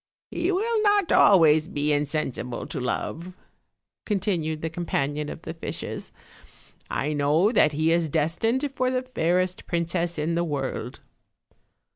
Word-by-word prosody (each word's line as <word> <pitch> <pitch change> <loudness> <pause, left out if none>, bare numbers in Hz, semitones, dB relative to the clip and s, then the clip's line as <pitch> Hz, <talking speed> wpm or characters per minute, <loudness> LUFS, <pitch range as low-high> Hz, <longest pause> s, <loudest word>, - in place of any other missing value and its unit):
"He 350 +3 0
will 435 +4 +1
not 410 -3 +3
always 160 -5 +6
be 150 -4 0
insensible 145 -4 -2
to - - -5
love," 170 +7 -3 0.7
continued 175 -7 -1
the 160 - -1
companion 150 -3 -2
of - - -8
the 165 - -5
fishes. 165 - -6 0.8
"I 150 +2 -1
know 150 +8 +3
that 155 -10 +4
he 155 +2 +1
is 165 -1 +1
destined 175 - 0
for 255 - +1
the 255 0 -1
fairest 185 -6 0
princess 170 0 -1
in 155 +2 -1
the 170 +1 +1
world." 145 -4 -4
165 Hz, 135 wpm, -25 LUFS, 150-200 Hz, 0.8 s, always